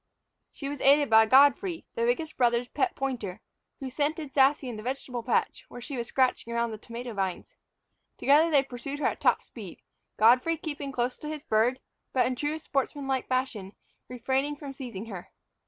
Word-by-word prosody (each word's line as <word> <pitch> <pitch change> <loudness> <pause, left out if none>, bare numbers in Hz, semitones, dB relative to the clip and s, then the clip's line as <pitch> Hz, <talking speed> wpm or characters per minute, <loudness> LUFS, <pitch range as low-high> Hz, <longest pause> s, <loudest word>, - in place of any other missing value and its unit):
She 275 - -7
was 285 -1 -5
aided 285 -1 +5
by 220 0 +7
Godfrey, 285 - +4
the 465 -1 0
biggest 335 -10 -1
brother's 240 0 +2
pet 370 +8 -1
pointer, 235 -8 -4 0.4
who 265 -3 -6
scented 295 +1 -2
Sassy 275 0 +3
in 240 - -5
the 215 - -7
vegetable 250 0 -4
patch, 240 +1 -1
where - - -9
she 270 +3 -6
was 235 -2 -3
scratching 255 -3 0
around 235 0 0
the 215 - -7
tomato 235 +2 -7
vines. 190 -3 -3 0.6
Together 300 +4 +4
they 285 -4 +4
pursued 270 +2 -6
her 300 - -3
at - - -1
top - - +3
speed, - - -11 0.3
Godfrey 250 +9 +4
keeping 290 -3 -5
close 250 -1 -1
to 300 - -8
his 305 -1 -6
bird, 235 +1 +2 0.3
but, 255 - +3
in 255 - -1
true 295 +4 -2
sportsmanlike 275 -3 -2
fashion, 245 -7 -2 0.4
refraining 265 +4 -1
from 280 -2 -8
seizing 235 -7 -7
her. 190 -6 -8
265 Hz, 180 wpm, -28 LUFS, 235-290 Hz, 0.6 s, by